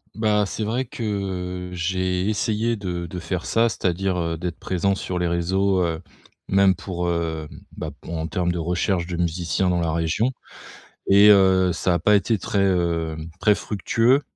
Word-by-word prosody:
Ben, 105 -1 +2
c'est 110 - -4
vrai 120 +5 -1
que 95 -7 -4
j'ai 90 +2 -1
essayé 110 +2 0
de 90 -4 -4
de 90 +2 -6
faire 90 0 -4
ça, 115 +1 +3
c'est-à-dire, 95 -2 -1
heu, 85 -1 -2
d'être 85 0 -5
présent 95 +2 0
sur 90 -1 -4
les 90 0 0
réseaux, 95 +3 +1
heu, 85 0 -2 0.5
même 95 -1 +4
pour, 90 -2 -4
heu, 80 -2 -2 0.3
bah, - - -4
p - - -10
en 80 -1 -3
termes 85 +2 -1
de 85 - -3
recherche 85 +1 0
de 90 -1 -4
musiciens 85 +2 0
dans 90 - +1
la 80 - 0
région 85 +8 0 0.8
et, 100 +2 +7
heu, 95 -2 +5
ça 85 +2 0
a - - +2
pas 105 +5 +3
été 105 +2 +2
très, 100 +2 0
hem, 85 -4 0
très 105 -1 +4
fructueux. 115 +6 +1
90 Hz, 175 wpm, -23 LUFS, 85-100 Hz, 0.8 s, et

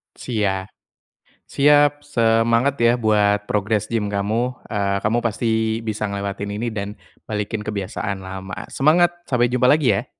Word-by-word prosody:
Sia 100 -6 -1 0.8
siap, 145 0 +3
semangat 115 -1 +2
ya 120 +1 +5
buat 105 -2 +2
progress 105 +1 0
gym 110 -3 0
kamu, 110 +5 -2
eee, 100 -2 0
kamu 110 +3 +2
pasti 110 -1 0
bisa 110 -1 -2
ngelewatin 100 0 -4
ini 120 +3 -2
dan 100 -1 -5 0.3
balikin 105 0 -3
kebiasaan 100 -1 -4
lama. 95 0 -7
Semangat, 170 +5 +3 0.2
sampai 120 -2 +2
jumpa 125 0 +2
lagi 145 -4 +4
ya. - - -7
110 Hz, 135 wpm, -21 LUFS, 100-120 Hz, 0.8 s, ya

